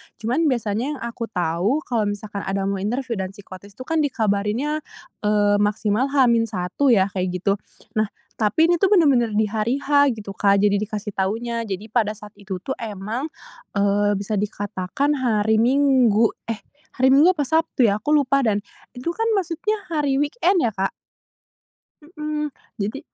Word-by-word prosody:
cuman 255 +9 0
biasanya 240 +2 -1
yang - - -10
aku 235 -1 -4
tahu, 180 - 0
kalau 225 -4 0
misalkan 205 0 -4
ada 195 0 -1
mau 195 0 -1
interview 235 +2 -2
dan 190 0 -4
psikotes 200 -1 -12
itu 255 - -8
kan 320 +3 0
dikabarinnya, 230 +2 0 0.5
eee, 205 -1 +3
maksimal 210 +4 +1
H-1 230 -9 +2 0.2
ya, 200 -5 +4
kayak 185 -1 -1
gitu. 195 +2 0 0.4
Nah, 215 - +2 0.3
tapi 215 +9 +2
ini 345 - +2
tuh 390 - +4
bener-bener 255 - +3
di 220 - +3
hari 220 +3 0
H 285 -3 +4
gitu, 205 -2 -8
Kak, 200 0 +3
jadi 205 -1 +3
dikasih 210 0 -4
tahunya, 230 +4 -1
jadi 195 +1 -4
pada 215 -2 +1
saat 210 0 -12
itu 190 -2 -6
tuh 265 - -4
emang, 220 +5 -4 0.5
eee, 205 +1 +2
bisa 200 +1 -2
dikatakan 205 +7 -2
hari 220 -3 +2
Minggu, 250 -3 +4 0.2
eh, 225 -2 -4 0.3
hari 260 +1 +4
Minggu 320 +7 +6
apa 295 - 0
Sabtu 320 -3 +1
ya, 205 - -1
aku 295 - -5
lupa. 275 -1 +3
Dan 210 -5 +1 0.3
itu 255 +7 -3
kan 450 +5 -1
maksudnya 390 +3 -1
hari 290 -4 +1
weekend 355 +5 +1
ya, 230 - +1
Kak. 195 0 -1 1.1
Mhm, 300 -2 -4 0.2
jadi 215 +7 -3
225 Hz, 165 wpm, -22 LUFS, 205-275 Hz, 1.1 s, Minggu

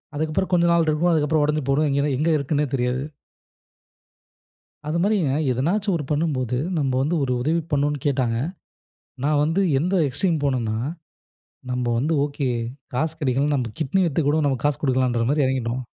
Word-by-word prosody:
அதுக்கப்புறம் 155 +5 -1
கொஞ்சம் 170 -1 +4
நாள் 170 -1 +3
இருக்கும். 165 +3 +2
அதுக்கப்புறம் 155 -1 +2
உடைஞ்சு 150 0 0
போயிடும் 150 +3 +2
எங்கனே 140 +1 +1
எங்க 155 +4 +1
இருக்குதுன்னே 145 +1 0
தெரியாது. 125 +1 -1 1.8
அது 155 +2 -1
மாதிரிங்க, 190 -8 +1 0.2
எதனாச்சும் 185 - 0
ஒரு 150 - -4
பண்ணும்போது 145 -6 0 0.2
நம்ம 140 -3 0
வந்து 150 +6 0
ஒரு 125 - -1
உதவி 160 +6 +1
பண்ணணும்னு 145 0 +1
கேட்டாங்க. 130 -5 +1 0.9
நான் 145 +1 +2
வந்து 165 +5 +1 0.2
எந்த 180 +6 0
எக்ஸ்ட்ரீம் 160 +5 0
போணேன்னா, 120 -6 0 0.9
நம்ம 125 0 -1
வந்து 155 +6 0
ஓகே, 140 -2 -2 0.5
காசு 155 +5 0
கெடைக்கலன்னா 140 +2 +1
நம்ம 120 -4 -2
கிட்னி 155 +6 +1
வித்து 165 +1 0
கூட 150 - +2
நம்ம 135 -2 0
காசு 145 -3 +1
குடுக்கலான்ற 130 -4 +1
மாரி 145 -1 +2
எறங்கிட்டோம். 130 -1 -1
145 Hz, 155 wpm, -23 LUFS, 130-160 Hz, 1.8 s, கொஞ்சம்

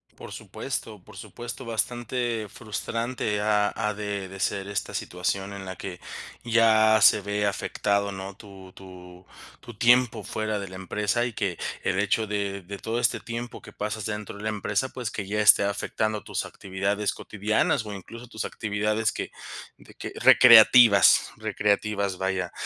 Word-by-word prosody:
Por - - -11
supuesto, 105 -5 -6
por 105 0 -15
supuesto, 120 +5 -8
bastante 120 0 -2
frustrante, 115 0 -3
ha 105 -1 +1
ha 105 -1 -1
de 100 -2 -5
de 95 +1 -10
ser 95 +1 -2
esta 100 -1 -3
situación 95 +2 -3
en 100 -1 -8
la 95 0 -6
que 90 0 -7 0.5
ya 110 -1 +5
se 100 - +7
ve 105 +1 -2
afectado, 100 0 -1
¿no?, 95 +1 -7
tu 95 -3 -13
tu 90 -1 -13 0.3
tu 120 - -11
tiempo 120 -1 +3
fuera 110 +1 -3
de 100 -1 -6
la 95 - -10
empresa 105 +5 -1
y 120 - -4
que 95 -4 -2 0.3
el 95 - 0
hecho 105 +2 +1
de 100 -1 -3
de 100 +3 -8
todo 115 +3 -3
este 120 - +1
tiempo 120 +1 -7
que - - -13
pasas 105 0 -4
dentro 105 -2 -5
de 105 - -10
la 110 - -1
empresa, 105 +2 -1
pues 125 -4 -5
que 100 -3 -5
ya 105 +2 -1
esté 105 -1 +7
afectando 105 +1 -2
tus - - -3
actividades 100 +2 -2
cotidianas 110 +4 -1
o 105 - -7
incluso 115 +5 -10
tus 110 -2 -5
actividades 105 +1 -1
que - - -5 0.5
de - - -18
que, - - -7
recreativas 115 -4 +7
recreativas, 100 -2 -1
vaya. 95 -1 -2
105 Hz, 165 wpm, -26 LUFS, 100-110 Hz, 0.5 s, se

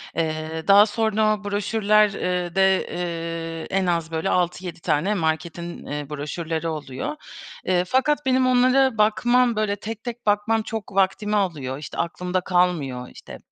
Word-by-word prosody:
Eee, 160 0 -2
daha 200 +1 +8
sonra 215 0 +1
o 205 - -12
broşürler, 210 +1 +2
eee, 180 -1 -2
de, 190 0 +3
eee, 165 -1 -4
en 190 - +1
az, 170 -2 -1
böyle, 160 +4 -1
6-7 180 -1 -1
tane 165 +6 +1
marketin, 170 0 -3
eee, 145 0 -5
broşürleri 160 +3 -4
oluyor. 150 - -4 0.5
Eee, 180 -1 +2
fakat 265 +6 +1
benim 260 0 +3
onlara 255 0 +4
bakmam, 240 +3 +3
böyle, 210 -1 0
tek 220 +2 -7
tek 240 -1 -7
bakmam 210 +2 +2
çok 220 -2 -6
vaktimi 195 +2 +1
alıyor. 150 -10 -1
İşte, 150 - -8
aklımda 180 +2 -2
kalmıyor, 165 -9 0
işte, - - -11
185 Hz, 145 wpm, -23 LUFS, 165-215 Hz, 0.5 s, daha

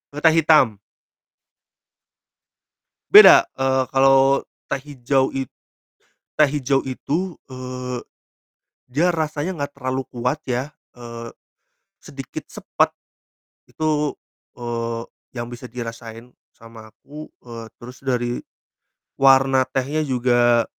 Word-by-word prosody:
E - - -4
teh 160 0 +6
hitam. 150 -10 +4 2.3
Beda, - - +9
eee, 130 0 +1
kalau 135 0 +4 0.2
teh 140 - -2
hijau 135 -2 0
it 135 -1 -3 0.9
teh 150 -1 +5
hijau 135 0 +1
itu, 160 +7 -3
eee, 125 -1 -6 0.9
dia 170 +7 +1
rasanya 155 +2 -2
gak 145 0 -6
terlalu 130 0 -2
kuat 125 +5 -2
ya, 130 +4 -3 0.2
eee, 115 -1 -8 0.7
sedikit 135 -2 -9
sepet - - -1 0.7
itu, 150 -2 -1 0.4
eee, 115 -1 -4 0.3
yang 120 0 -5
bisa 120 +1 -9
dirasain 115 0 -8 0.2
sama 115 -1 -14
aku, 150 +2 -11 0.2
eee, 115 -2 -9
terus 125 +2 -12
dari 125 -2 -2 0.8
warna 135 -1 +5
tehnya 140 +4 -1
juga 120 -4 +2
130 Hz, 100 wpm, -21 LUFS, 120-140 Hz, 2.3 s, Beda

